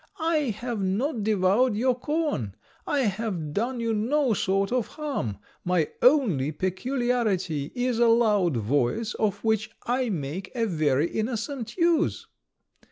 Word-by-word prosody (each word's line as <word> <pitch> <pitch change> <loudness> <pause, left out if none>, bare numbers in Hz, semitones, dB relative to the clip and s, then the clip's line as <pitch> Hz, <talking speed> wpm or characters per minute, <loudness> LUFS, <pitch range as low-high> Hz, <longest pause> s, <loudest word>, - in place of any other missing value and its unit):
I 315 -4 +1
have 240 -4 -3
not 220 +7 0
devoured 210 +3 +3
your 250 +4 +2
corn; 290 - -2 0.3
I 285 - +1
have 195 - -2
done 240 +6 -1
you 230 -1 0
no 245 +4 +1
sort 195 0 0
of 250 -4 0
harm. 275 - -4 0.3
My 180 -3 +1
only 220 - +4
peculiarity 190 - -1
is 245 -1 0
a 240 - +5
loud 210 - +3
voice, 140 - 0
of 210 -3 -1
which 220 -1 +1 0.2
I 250 0 0
make 175 +2 -4
a 230 -2 +1
very 155 -6 +1
innocent 230 - -3
use.' 335 -2 +2
220 Hz, 135 wpm, -26 LUFS, 185-250 Hz, 0.3 s, a